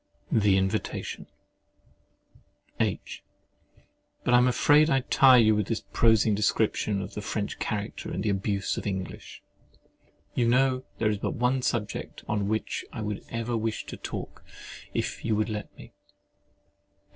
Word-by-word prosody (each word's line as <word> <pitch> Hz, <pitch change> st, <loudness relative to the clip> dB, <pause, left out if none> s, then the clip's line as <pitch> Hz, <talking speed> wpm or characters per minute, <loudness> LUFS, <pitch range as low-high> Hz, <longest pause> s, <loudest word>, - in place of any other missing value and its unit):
— -, -, -32 dB
THE 95 Hz, -2 st, +5 dB
INVITATION 95 Hz, 0 st, -2 dB, 1.5 s
H. -, -, -2 dB, 1.0 s
But 125 Hz, -, +1 dB
I -, -, +8 dB
am 125 Hz, -, +4 dB
afraid 145 Hz, +5 st, +5 dB
I 135 Hz, -3 st, +3 dB
tire 130 Hz, 0 st, +6 dB
you 110 Hz, -2 st, +5 dB
with 105 Hz, -2 st, 0 dB
this 115 Hz, -, -2 dB
prosing 110 Hz, -2 st, +4 dB
description 105 Hz, -1 st, +1 dB
of 100 Hz, -, -8 dB
the 105 Hz, -, -5 dB
French 100 Hz, 0 st, -3 dB
character 105 Hz, -1 st, -3 dB
and 100 Hz, -, -3 dB
abuse 100 Hz, -1 st, 0 dB
of -, -, -4 dB
the -, -, 0 dB
English? 95 Hz, -1 st, -6 dB, 0.9 s
You 120 Hz, -, +1 dB
know 130 Hz, +1 st, +2 dB
there 110 Hz, -1 st, +1 dB
is 105 Hz, -, -2 dB
but -, -, -2 dB
one 125 Hz, +2 st, +1 dB
subject 105 Hz, -5 st, -3 dB
on 105 Hz, -2 st, 0 dB
which 110 Hz, +1 st, -2 dB
I -, -, -6 dB
should 105 Hz, -1 st, -4 dB
ever 115 Hz, +1 st, -2 dB
wish 110 Hz, 0 st, -2 dB
to -, -, -7 dB
talk, -, -, -7 dB, 0.5 s
if -, -, -3 dB
you 110 Hz, -2 st, +1 dB
would 110 Hz, +1 st, 0 dB
let 105 Hz, -1 st, -5 dB
me. -, -, -13 dB
110 Hz, 155 wpm, -27 LUFS, 105-120 Hz, 1.5 s, I